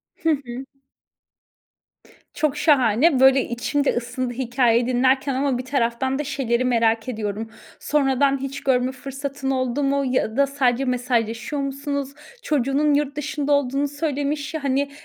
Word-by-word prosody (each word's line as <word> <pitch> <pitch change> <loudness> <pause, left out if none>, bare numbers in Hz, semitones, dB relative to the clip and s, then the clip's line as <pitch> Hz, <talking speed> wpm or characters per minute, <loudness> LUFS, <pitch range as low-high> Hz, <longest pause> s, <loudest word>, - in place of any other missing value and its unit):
Hı 325 - -1
hı. 265 -4 -2 1.7
Çok 295 -2 0
şahane. 270 -1 +3
Böyle 265 0 +6
içim 260 +4 -1
de - - +2
ısındı 245 +1 -3
hikâyeyi 240 -1 +1
dinlerken 260 +2 +2
ama 265 -1 0
bir 250 - -5
taraftan 260 0 0
da 295 - -1
şeyleri 255 -4 -1
merak 230 -1 +1
ediyorum. 220 -1 -4 0.3
Sonradan 275 -1 +2
hiç 275 0 -5
görme 255 -1 +2
fırsatın 270 +1 -5
oldu 255 +1 -1
mu 280 0 +1
ya 250 -2 -1
da 280 - +4
sadece 270 -2 +1
mesajlaşıyor 245 +2 -1
musunuz? 280 0 -3 0.3
Çocuğunun 290 +1 +1
yurt 285 -1 0
dışında 295 0 -2
olduğunu 285 0 +1
söylemiş 290 0 -3
ya, 315 -2 -4
hani, 280 +1 0
270 Hz, 140 wpm, -22 LUFS, 245-285 Hz, 1.7 s, Böyle